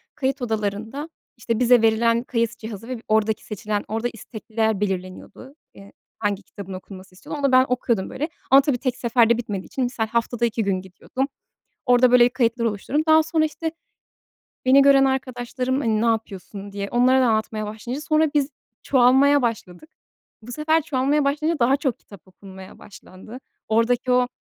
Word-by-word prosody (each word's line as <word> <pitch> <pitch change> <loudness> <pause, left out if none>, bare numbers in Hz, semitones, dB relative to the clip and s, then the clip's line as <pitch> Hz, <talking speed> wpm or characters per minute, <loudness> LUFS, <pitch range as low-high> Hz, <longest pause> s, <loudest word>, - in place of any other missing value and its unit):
Kayıt 270 +1 -2
odalarında, 220 +6 -3 0.3
işte, 230 0 -2
bize 245 -1 +5
verilen 230 +1 +2
kayıt 230 -2 -2
cihazı 220 0 -8
ve 255 -3 -5
oradaki 220 0 +1
seçilen, 210 0 -3
orada 225 +2 -2
istekliler 220 -1 -3
belirleniyordu. 190 +7 -5 0.2
Eee, 195 0 -15 0.3
hangi 205 -2 -2
kitabın 195 0 -10
okunması 185 0 -11
istiyor 190 - -8
onu 285 - -6
da 275 - +3
ben 255 0 +6
okuyordum, 235 -5 -1
böyle, 300 +5 -4 0.2
ama 270 +1 +8
tabii 275 -3 0
tek 250 0 -2
seferde 235 -1 +3
bitmediği 205 -5 -5
için, 265 - -3
misal, 245 -3 -2
haftada 235 +1 -1
2 225 0 -1
gün 195 -2 -1
gidiyordum. 190 +8 -5 0.6
Orada, 245 0 +5
böyle, 245 -1 +6
kayıtlar 240 -1 0
oluşturdum. 230 +7 -1
Daha 315 0 +6
sonra, 315 0 0
işte, 320 +1 -4 0.9
beni 265 +2 +6
gören 275 -1 +6
arkadaşlarım, 260 0 -2
hani, 220 -4 0
ne - - +1
yapıyorsun 205 -3 -3
diye 200 0 -5
onlara 255 +2 +3
da - - +3
anlatmaya 220 -1 -1
başlayınca 225 +6 -6
sonra 310 0 +2
biz 290 -1 +1 0.3
çoğalmaya 270 +2 +4
başladık. 230 - -4 0.5
Bu 230 +3 -10
sefer 315 +4 +1
çoğalmaya 285 0 0
başlayınca 305 +2 0
daha 260 +3 +3
çok 270 -5 -2
kitap 200 -3 -16
okunmaya 190 0 -13
başlandı. 200 +4 -13 0.3
Oradaki 235 +3 +1
o, 250 0 +3
235 Hz, 165 wpm, -22 LUFS, 215-265 Hz, 0.9 s, ama